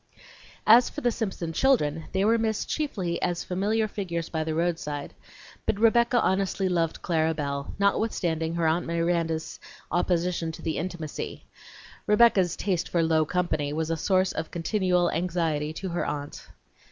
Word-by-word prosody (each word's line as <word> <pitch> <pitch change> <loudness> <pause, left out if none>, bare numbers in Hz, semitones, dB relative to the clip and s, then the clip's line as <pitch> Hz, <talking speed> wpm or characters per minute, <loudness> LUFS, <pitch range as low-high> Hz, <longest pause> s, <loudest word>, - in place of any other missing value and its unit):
As 235 +3 +7
for 295 - -7
the 245 - +2
Simpson 190 -7 -3
children, 165 - +2
they 190 +1 +1
were 230 +2 +4
missed 220 -1 -1
chiefly 195 - -2
as 175 -1 -1
familiar 210 +4 0
figures 175 -5 -4
by 160 -1 -1
the 155 0 -2
roadside; 160 -4 -2 0.5
but 200 - 0
Rebecca 235 +2 +4
honestly 195 0 +1
loved 170 -3 -1
Clara 160 -1 +1
Belle, 140 -2 -4
notwithstanding 175 -5 0
her 170 -1 0
Aunt 160 +3 +1
Miranda's 165 -1 -1 0.3
opposition 175 -1 0
to - - -10
the 160 - -1
intimacy. 165 -3 -5 0.6
Rebecca's 210 -5 +4
"taste 185 -4 -1
for 170 -1 +1
low 160 -1 +3
company" 155 -4 -1
was 160 +1 -1
a - - +1
source 185 +3 +2
of 160 - -4
continual 180 0 +1
anxiety 165 -3 -1
to 190 +3 -5
her 175 0 -1
aunt. 145 -1 -5
175 Hz, 155 wpm, -26 LUFS, 160-195 Hz, 0.6 s, As